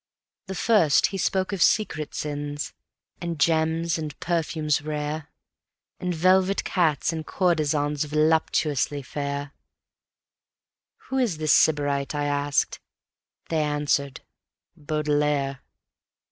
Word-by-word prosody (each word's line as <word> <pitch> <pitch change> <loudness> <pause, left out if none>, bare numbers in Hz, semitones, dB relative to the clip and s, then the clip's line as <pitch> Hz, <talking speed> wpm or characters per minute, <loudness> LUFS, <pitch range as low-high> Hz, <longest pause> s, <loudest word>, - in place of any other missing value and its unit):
The 190 - -5
first 180 -9 +4
he - - -2
spoke 190 +2 0
of 190 - -3
secret 155 -9 +1
sins, 145 0 -4 0.5
and 170 -3 -4
gems 160 +2 +1
and 150 -3 -6
perfumes 160 -3 0
rare; 150 0 -4 0.7
And 180 - -2
velvet 185 +3 +3
cats 165 -3 +1
and 160 -1 -4
courtesans 150 -4 0
voluptuously 155 -2 +1
fair: 140 +1 -4 1.6
"Who 265 - 0
is 225 -11 +1
the 155 0 -3
Sybarite?" 145 -2 +3
I 145 0 -1
asked. 145 0 0 0.7
They 160 -2 +1
answered: 145 -2 0 0.5
"Baudelaire." 150 -2 0
150 Hz, 105 wpm, -25 LUFS, 145-165 Hz, 1.6 s, first